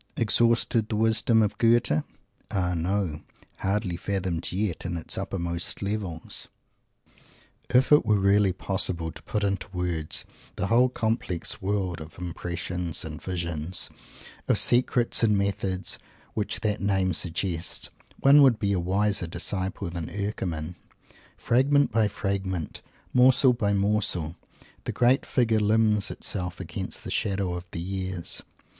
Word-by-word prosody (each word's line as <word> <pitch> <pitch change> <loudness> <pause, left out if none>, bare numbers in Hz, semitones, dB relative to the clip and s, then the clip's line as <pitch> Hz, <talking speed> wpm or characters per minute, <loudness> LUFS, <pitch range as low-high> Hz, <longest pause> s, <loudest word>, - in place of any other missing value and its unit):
Exhausted, 115 0 +2
the 110 - -1
wisdom 110 +1 +3
of 105 0 -2
Goethe? 115 -9 +3 0.5
Ah, 90 -2 0
no! 85 -2 -1 0.4
hardly 95 -2 -1
fathomed 90 -2 -2
yet, 95 -2 -2
in 85 -1 -3
its 80 - -3
uppermost 85 0 -3
levels! 100 -6 -3 1.2
If 125 +3 +3
it 150 - +7
were 105 -3 +2
really 100 0 +4
possible 90 -3 -1
to - - -12
put 105 - -2
into 100 -2 -1
words 90 -4 -3 0.3
the - - -1
whole 120 +4 +4
complex 110 -7 -1
world 95 -4 -1
of 80 +1 -10
impressions 90 -1 -3
and 80 -1 -7
visions, 85 -1 -3 0.6
of - - +4
secrets 120 -1 +3
and 105 -3 +4
methods, 100 -1 -1 0.3
which 105 -2 -2
that 105 -1 0
name 95 -2 +1
suggests, 85 0 -1 0.3
one 140 +2 +7
would 130 -5 +6
be 100 -2 0
a 95 - +1
wiser 95 +1 +1
disciple 95 +1 -3
than 85 -2 -4
Eckermann. 90 -5 -3 0.6
Fragment 140 +3 +3
by 110 -1 +3
fragment, 95 -5 -3 0.3
morsel 125 +1 +6
by 105 -4 0
morsel, 100 -5 0 0.5
the - - -1
great 125 +2 +3
Figure 115 -4 +2
limns 105 0 +3
itself 90 -2 -3
against - - -5
the - - -6
shadow 95 -3 0
of 90 0 -6
the - - -5
years. 95 0 -3
100 Hz, 135 wpm, -26 LUFS, 90-110 Hz, 1.2 s, it